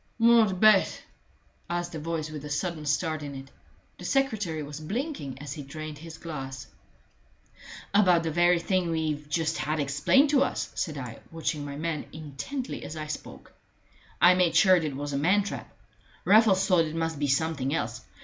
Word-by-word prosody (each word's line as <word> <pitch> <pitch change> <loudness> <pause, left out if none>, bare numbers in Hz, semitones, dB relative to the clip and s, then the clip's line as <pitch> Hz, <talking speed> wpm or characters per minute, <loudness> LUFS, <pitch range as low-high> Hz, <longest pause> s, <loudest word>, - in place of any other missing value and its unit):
"What 230 -5 +4
bet?" 215 -2 +4 0.7
asked 175 0 -2
a 160 - -4
voice 155 -1 -3
with 150 -2 -7
a 150 - -7
sudden 155 0 -3
start 155 +1 0
in 145 -1 -6
it. 135 0 -10 0.5
The - - -9
secretary 215 - 0
was 145 +1 -7
blinking 195 - -4
as 145 -1 -6
he 150 - -7
drained 150 +2 -7
his 160 0 -10
glass. 135 -5 -6 1.3
"About 180 -5 +5
the 165 - -1
very 175 +2 +4
thing 180 0 0
we've 155 -2 -2
just 160 0 0
had 150 +4 -1
explained 150 - +3
to 280 -3 +4
us," - - -1
said 155 -5 -3
I, 125 -4 -7
watching 160 -2 -3
my 140 -1 -6
man 155 0 -3
intently 155 - -6
as 155 - -7
I 155 - -4
spoke. 150 - -8 0.7
"I 175 +3 +7
made 180 -2 +2
sure 185 -3 +7
it 155 -6 -1
was 145 +1 -4
a - - 0
man 190 +7 +3
trap. 200 - -6 0.5
Raffles 205 -3 +5
thought 180 -4 +4
it 155 0 -6
must 165 -2 -2
be 145 - 0
something 140 -1 0
else. 115 -7 -2
160 Hz, 180 wpm, -27 LUFS, 145-185 Hz, 1.3 s, I